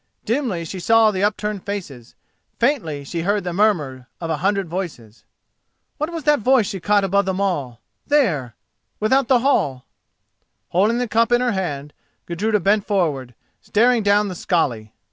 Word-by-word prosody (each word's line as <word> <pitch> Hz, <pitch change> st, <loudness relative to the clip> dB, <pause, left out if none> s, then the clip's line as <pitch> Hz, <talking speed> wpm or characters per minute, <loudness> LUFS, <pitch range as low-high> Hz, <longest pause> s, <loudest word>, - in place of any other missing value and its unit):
Dimly 225 Hz, -, -1 dB
she 185 Hz, +3 st, -6 dB
saw 225 Hz, +3 st, +4 dB
the 190 Hz, -1 st, -2 dB
upturned 210 Hz, -1 st, -1 dB
faces, 160 Hz, -, -7 dB, 0.4 s
faintly 210 Hz, -, 0 dB
she 165 Hz, +4 st, -4 dB
heard 200 Hz, +3 st, 0 dB
the 175 Hz, -1 st, -3 dB
murmur 150 Hz, -, 0 dB
of 165 Hz, -1 st, -4 dB
a 160 Hz, -, 0 dB
hundred 195 Hz, +2 st, 0 dB
voices. 155 Hz, -, -7 dB, 0.7 s
What 305 Hz, +3 st, -2 dB
was 330 Hz, -2 st, -5 dB
that 295 Hz, +1 st, +3 dB
voice 250 Hz, 0 st, +3 dB
she 195 Hz, -1 st, -4 dB
caught 205 Hz, +3 st, +2 dB
above 200 Hz, +1 st, +2 dB
them 190 Hz, 0 st, -1 dB
all—there—without 195 Hz, -, -1 dB
the 255 Hz, -1 st, +4 dB
hall? 140 Hz, -, +1 dB, 0.8 s
Holding 210 Hz, +7 st, +2 dB
the 245 Hz, 0 st, -1 dB
cup 230 Hz, +2 st, +2 dB
in 240 Hz, -, +4 dB
her 250 Hz, -1 st, +1 dB
hand, 150 Hz, -8 st, -4 dB, 0.3 s
Gudruda 210 Hz, +5 st, 0 dB
bent 200 Hz, +3 st, +2 dB
forward, 145 Hz, -, -1 dB, 0.3 s
staring 235 Hz, +2 st, +2 dB
down 205 Hz, 0 st, +3 dB
the 190 Hz, -, -4 dB
skali. 135 Hz, -, -1 dB
200 Hz, 155 wpm, -21 LUFS, 165-225 Hz, 0.8 s, saw